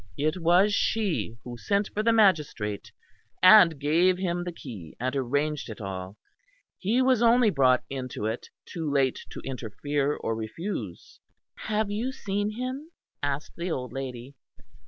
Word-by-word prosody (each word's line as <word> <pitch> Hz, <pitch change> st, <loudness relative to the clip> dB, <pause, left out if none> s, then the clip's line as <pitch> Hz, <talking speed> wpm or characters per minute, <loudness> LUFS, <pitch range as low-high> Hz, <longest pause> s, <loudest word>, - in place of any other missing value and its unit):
It 155 Hz, +4 st, 0 dB
was 180 Hz, +4 st, +4 dB
she 195 Hz, -, 0 dB
who 120 Hz, -1 st, -7 dB
sent 200 Hz, -, 0 dB
for 210 Hz, -, 0 dB
the 230 Hz, +1 st, +3 dB
magistrate 150 Hz, -, +1 dB, 0.5 s
and 185 Hz, -6 st, +8 dB
gave 170 Hz, +6 st, +3 dB
him 175 Hz, -2 st, -1 dB
the 175 Hz, -, -4 dB
key 110 Hz, -, -10 dB
and 130 Hz, +3 st, -2 dB
arranged 145 Hz, +2 st, -1 dB
it 110 Hz, -, -8 dB
all; 95 Hz, -1 st, -6 dB, 0.6 s
he 230 Hz, +7 st, +2 dB
was 255 Hz, -3 st, +3 dB
only 235 Hz, -1 st, +5 dB
brought 130 Hz, -4 st, +3 dB
into 130 Hz, -5 st, -5 dB
it 110 Hz, +2 st, -3 dB, 0.2 s
too 160 Hz, -3 st, -4 dB
late 135 Hz, -2 st, +1 dB
to -, -, -8 dB
interfere 140 Hz, +4 st, -2 dB
or 115 Hz, -, -3 dB
refuse." 110 Hz, -, -6 dB, 0.4 s
"Have 215 Hz, -1 st, -2 dB
you 230 Hz, +6 st, -2 dB
seen 205 Hz, -4 st, -2 dB
him?" 255 Hz, +7 st, -5 dB, 0.3 s
asked 145 Hz, +1 st, -3 dB
the 170 Hz, +2 st, -3 dB
old 125 Hz, -6 st, -4 dB
lady. 130 Hz, -1 st, -6 dB
155 Hz, 150 wpm, -27 LUFS, 125-205 Hz, 0.6 s, and